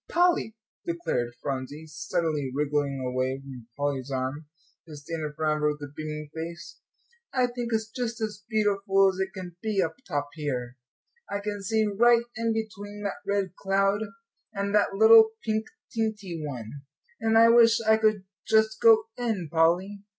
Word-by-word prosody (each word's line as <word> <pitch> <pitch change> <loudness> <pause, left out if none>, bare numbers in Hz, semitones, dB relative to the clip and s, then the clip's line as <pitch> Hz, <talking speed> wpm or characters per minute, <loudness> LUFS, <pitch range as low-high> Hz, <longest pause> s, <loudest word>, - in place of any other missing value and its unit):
"Polly," 345 -10 +2 0.3
declared 230 - -2
Phronsie, 140 +3 -4
suddenly 155 -2 -2
wriggling 145 0 -1
away 130 +1 -1
from 130 -4 -11
Polly's 140 -2 -2
arm, 135 +3 -3 0.4
to 155 - -9
stand 155 +3 -6
in 150 - -3
front 155 -1 +1
of - - -4
her 150 0 +3
with 150 - -14
a 145 0 -8
beaming 150 -1 -5
face, 170 +2 -7 0.5
"I 255 -2 +2
think 240 -1 -4
it's 220 -1 0
just 235 -1 -4
as 210 -2 -4
beautiful 200 -3 +3
as 185 - -9
it 190 - -1
can 180 -3 -8
be 215 -3 -1
up 160 -3 +1
top 145 -4 -2
here. 130 -5 -4 0.5
I 200 - -2
can 205 0 -4
see 220 +2 +1
right 235 +3 +4
in 230 +1 0
between 210 -2 -5
that 200 - -4
red 195 -3 -1
cloud 195 +1 +1 0.5
and 200 0 -2
that 205 -1 +2
little 220 +1 +7
pink 220 0 0 0.3
teenty 210 -7 -2
one. 135 -2 -6 0.4
And 225 0 +2
I 230 +1 +7
wish 230 -1 +6
I 220 0 +4
could 215 -3 +2 0.2
just 220 0 +3
go 225 -1 +7 0.2
in, 215 -9 -2
Polly." 175 +5 +2
195 Hz, 165 wpm, -27 LUFS, 150-220 Hz, 0.5 s, little